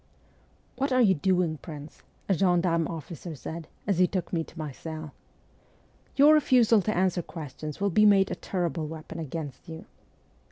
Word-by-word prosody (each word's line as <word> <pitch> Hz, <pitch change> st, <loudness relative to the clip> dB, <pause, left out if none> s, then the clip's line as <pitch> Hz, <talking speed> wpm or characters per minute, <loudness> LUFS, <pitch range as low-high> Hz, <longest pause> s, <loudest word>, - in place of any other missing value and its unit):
' -, -, -36 dB
What 275 Hz, +1 st, 0 dB
are 255 Hz, 0 st, +4 dB
you 195 Hz, -4 st, +5 dB
doing, 175 Hz, -2 st, +1 dB
prince? 150 Hz, -2 st, -10 dB
' -, -, -36 dB
a 195 Hz, -, +3 dB
gendarme 175 Hz, -2 st, +2 dB
officer 165 Hz, 0 st, -7 dB
said, 160 Hz, +3 st, -7 dB, 0.2 s
as 195 Hz, -3 st, 0 dB
he 180 Hz, -, +5 dB
took 185 Hz, -1 st, -4 dB
me 165 Hz, -2 st, +1 dB
to 165 Hz, -, -16 dB
my 155 Hz, -2 st, -4 dB
cell. 155 Hz, +1 st, -7 dB, 1.0 s
'Your 290 Hz, +3 st, +7 dB
refusal 245 Hz, -7 st, +5 dB
to 215 Hz, +1 st, -1 dB
answer 185 Hz, -1 st, +2 dB
questions 155 Hz, -1 st, -8 dB
will 200 Hz, 0 st, +1 dB
be 210 Hz, +4 st, +5 dB
made 195 Hz, -1 st, +4 dB
a -, -, -1 dB
terrible 170 Hz, -4 st, -2 dB
weapon 160 Hz, +1 st, -8 dB
against 150 Hz, -2 st, -6 dB
you.' 160 Hz, 0 st, -8 dB
170 Hz, 175 wpm, -27 LUFS, 155-195 Hz, 1.0 s, Your